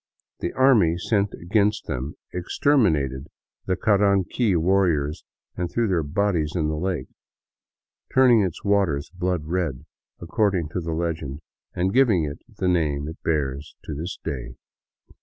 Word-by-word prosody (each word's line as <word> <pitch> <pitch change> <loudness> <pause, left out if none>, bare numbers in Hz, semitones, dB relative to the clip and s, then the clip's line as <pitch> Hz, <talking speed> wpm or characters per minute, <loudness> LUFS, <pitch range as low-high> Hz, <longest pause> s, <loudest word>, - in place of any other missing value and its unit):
The 85 - -2
army 110 -11 +4
sent 100 +2 0
against 105 +4 +1
them 65 +4 -4 0.2
exterminated 85 - +1 0.4
the 95 - +2
Caranqui 100 +1 +2
warriors 85 -4 +1 0.3
and 90 -1 -2
threw 120 +3 0
their 90 -4 +1
bodies 80 0 0
into 80 -3 0
the 80 - -1
lake, 90 -6 -2 0.6
" - - -39
turning 125 -4 +6
its 95 -5 -3
waters 95 -9 +1
blood 90 -2 -1
red," 80 -6 -2 0.3
according 90 -2 0
to 90 - -3
the 80 -1 -3
legend, 80 -4 -3 0.3
and 95 +2 0
giving 115 -10 +4
it 75 -1 -4
the 95 - -3
name 75 -5 +1
it 80 - -8
bears 70 -2 -2
to - - -5
this 80 +6 -5
day. 65 -2 -5
85 Hz, 140 wpm, -24 LUFS, 75-100 Hz, 0.6 s, turning